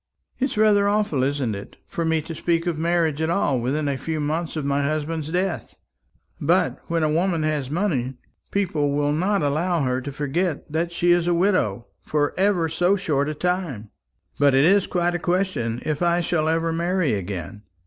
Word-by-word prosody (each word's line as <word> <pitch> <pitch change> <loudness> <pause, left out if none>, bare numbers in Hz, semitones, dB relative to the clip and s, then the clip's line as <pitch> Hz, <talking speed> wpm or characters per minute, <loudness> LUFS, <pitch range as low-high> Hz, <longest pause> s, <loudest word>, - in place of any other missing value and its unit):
"It 265 - +2
is 260 - -4
rather 210 -2 +4
awful, 205 -9 +1
isn't 135 -4 0
it, 100 0 -8
for 170 - -3
me 160 -1 +1
to 165 - -6
speak 165 +1 0
of 170 -3 -1
marriage 165 -2 +1
at 160 - 0
all 145 -7 +1
within 140 +5 -1
a 140 -2 -1
few 160 +3 -3
months 155 +3 -2
of 155 -3 -3
my 140 0 +1
husband's 155 +1 -2
death? 180 +2 -2 0.6
But - - +2
when 165 -1 0
a 155 - +2
woman 170 0 +1
has 150 -4 -1
money, 145 -7 -1 0.3
people 155 -8 0
will 145 0 +1
not 185 +4 +1
allow 160 +4 +1
her 130 0 0
to 140 +2 -5
forget 145 +3 -2
that 165 +2 -1
she 175 +1 +2
is 175 -1 +3
a 175 - +3
widow 170 - +1 0.2
for 150 -1 0
ever 190 -3 +2
so 180 +4 +2
short 150 -7 0
a 155 - -3
time. 165 - -2 0.5
But 140 -2 +4
it 135 +2 +5
is 195 +2 +4
quite 175 0 0
a 175 - -1
question 175 -11 -1
if 155 0 -2
I 175 0 +2
shall 160 -2 0
ever 165 0 +1
marry 170 -3 +1
again. 95 0 -5
160 Hz, 195 wpm, -23 LUFS, 145-175 Hz, 0.6 s, it